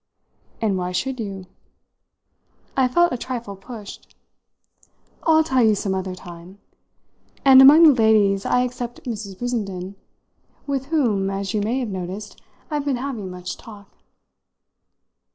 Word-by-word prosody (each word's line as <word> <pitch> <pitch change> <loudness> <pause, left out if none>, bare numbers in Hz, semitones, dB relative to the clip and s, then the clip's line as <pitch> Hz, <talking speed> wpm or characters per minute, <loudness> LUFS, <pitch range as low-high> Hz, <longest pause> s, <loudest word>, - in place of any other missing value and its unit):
'" - - -37
"And 200 -4 +1
why 180 0 -3
should 260 +6 -2
you?" 195 -4 -6 1.3
I 265 -1 +3
felt 345 +7 +3
a 250 - -4
trifle 235 -6 -5
pushed. 205 +1 -11 1.1
"I'll 320 -1 +4
tell 260 -5 +1
you 215 -1 +4
some 195 -1 -2
other 190 -1 -3
time. 175 +1 -12 0.9
And 265 -1 +9
among 295 +5 +9
the 310 -3 +8
ladies 215 -4 +3
I 250 - +2
except 245 -1 -6
Mrs. 210 -5 -6
Brissenden, 195 -6 -4 0.7
with 275 -2 -3
whom, 230 -11 +1
as 195 +1 -3
you 210 - 0
may 225 +5 -1
have 250 -4 -2
noticed, 190 +2 -7 0.3
I've 295 -1 -2
been 275 -3 0
having 240 -7 -5
much 180 0 -7
talk." 205 -3 -14
220 Hz, 140 wpm, -22 LUFS, 195-255 Hz, 1.3 s, And